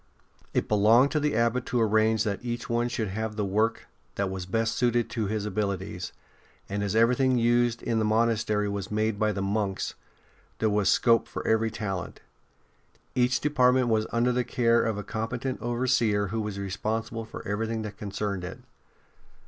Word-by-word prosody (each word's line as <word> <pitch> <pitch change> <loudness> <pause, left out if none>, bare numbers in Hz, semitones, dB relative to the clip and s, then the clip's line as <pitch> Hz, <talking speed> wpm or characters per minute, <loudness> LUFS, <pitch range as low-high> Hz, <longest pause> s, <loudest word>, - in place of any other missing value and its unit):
It - - 0
belonged 110 +6 +5
to 155 - +1
the 150 -3 0
Abbot 115 +2 +1
to 125 - 0
arrange 110 0 +3
that 105 0 -3
each 120 0 -4
one 120 0 0
should 115 -4 -2
have 110 +2 -3
the 105 -1 -1
work 110 +4 0 0.3
that 100 -1 -1
was 95 -2 -5
best 115 +3 0
suited 120 -1 +1
to 110 -4 -1
his 105 0 -2
abilities, 100 -3 -3 0.6
and 100 +1 -3
as 100 0 -1
everything 125 +3 +3
used 120 0 +2
in 115 -1 0
the - - +1
monastery 110 -1 +1
was 100 -2 -4
made 110 0 0
by 110 -1 +2
the 100 -1 -3
monks, 100 -1 -1 0.6
there 110 -1 +1
was 105 -2 +2
scope 115 +3 +4
for - - -6
every 110 0 +2
talent. 95 -4 -4 0.9
Each 125 0 +2
department 130 -4 +3
was 110 -1 +1
under 120 +1 +2
the 125 0 +1
care 120 -1 +2
of 110 -2 -1
a 105 - -4
competent 120 +4 -3
overseer 120 -4 +1
who 110 +2 -2
was 105 -2 -4
responsible 110 +4 -3
for 110 - -9
everything 110 +2 -2
that 105 -1 -7
concerned 100 -2 -3
it. 90 - -6
110 Hz, 175 wpm, -27 LUFS, 105-120 Hz, 0.9 s, belonged